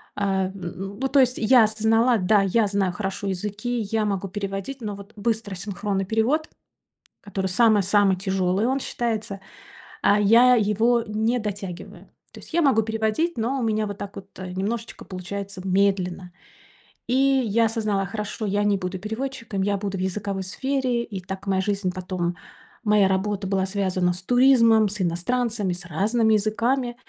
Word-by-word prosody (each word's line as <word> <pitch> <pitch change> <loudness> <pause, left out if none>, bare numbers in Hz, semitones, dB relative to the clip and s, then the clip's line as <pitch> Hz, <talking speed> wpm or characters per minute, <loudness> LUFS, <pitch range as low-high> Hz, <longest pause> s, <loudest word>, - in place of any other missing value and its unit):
Ам, 190 -2 0
м, 195 +2 -7
ну 270 - 0
то 275 +1 +3
есть 255 0 +2
я 240 +1 +5
осознала, 225 +2 +2
да, 200 +2 +3
я 210 +2 +2
знаю 195 -2 0
хорошо 195 +1 -4
языки, 210 +5 -3
я 220 -1 +1
могу 195 -1 -2
переводить, 195 +6 -5
но 210 -2 -4
вот 200 +2 -12
быстро 215 -2 -2
синхронный 195 +1 -3
перевод, 230 +10 0 0.7
который 195 -1 -4
самый-самый 205 -1 +3
тяжёлый 190 +1 0
он 265 +1 +1
считается, 220 -6 -3 0.6
а 205 +1 +4
я 235 +5 +6
его 225 +2 +2
не 220 +3 0
дотягиваю. 205 -4 -6 0.3
То - - -11
есть - - -13
я 340 - +3
могу 260 -8 +3
переводить, 220 +9 -1
но 245 +5 0
у - - -2
меня 215 -1 0
вот 205 - -6
так 200 0 -7
вот, 195 0 -11
немножечко 195 +5 -4
получается 190 +1 -6
медленно. 185 -2 0 0.8
И 240 - -1
я 260 -5 +3
осознала: 215 -3 0
хорошо 210 +2 -5
я 205 +1 0
не 205 -1 +2
буду 185 0 -4
переводчиком, 220 0 -4
я 200 +1 +1
буду 195 -1 -4
в 185 - -4
языковой 195 +1 -3
сфере. 255 +4 -1
И 205 -5 -6
так 190 +2 -7
моя 190 -1 +1
жизнь, 195 -1 -1
потом 180 -1 -3 0.5
моя 210 -3 +4
работа 195 +1 -1
была 190 0 0
связана 185 -2 0
с 180 - -5
туризмом, 230 -3 +5
с 205 0 -4
иностранцами, 200 +3 -1
с 180 - -7
разными 220 +5 +2
языками. 240 +4 0
205 Hz, 160 wpm, -24 LUFS, 195-230 Hz, 0.8 s, я